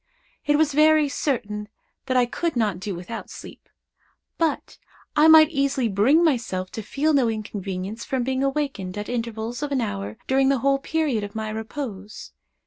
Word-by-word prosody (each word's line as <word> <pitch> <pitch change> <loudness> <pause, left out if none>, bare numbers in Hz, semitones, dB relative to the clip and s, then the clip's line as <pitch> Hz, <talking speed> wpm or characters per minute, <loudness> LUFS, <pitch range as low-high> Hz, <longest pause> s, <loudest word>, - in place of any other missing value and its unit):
It 295 - +4
was 300 -2 +2
very 305 0 +5
certain 210 -7 -2 0.4
that 255 - +1
I 250 - +4
could 330 +6 -2
not 210 -6 0
do 195 0 -4
without 185 +7 -7
sleep; - - -12 0.7
but 325 -3 -1 0.4
I 305 +1 +6
might 315 0 +8
easily 275 -4 +1
bring 235 - +4
myself 225 - 0
to 220 - -5
feel 290 +8 0
no 265 -5 +3
inconvenience 205 -1 -5
from 260 -2 -2
being 260 +1 -1
awakened 275 -10 -2
at 205 - -5
intervals 230 0 -4
of 295 -1 -3
an 275 - +1
hour 100 - -4
during 265 0 +3
the 275 - +3
whole 275 0 +3
period 285 -7 -1
of 205 +1 -7
my 220 -1 -3
repose. 220 -2 -6
245 Hz, 170 wpm, -24 LUFS, 210-285 Hz, 0.7 s, might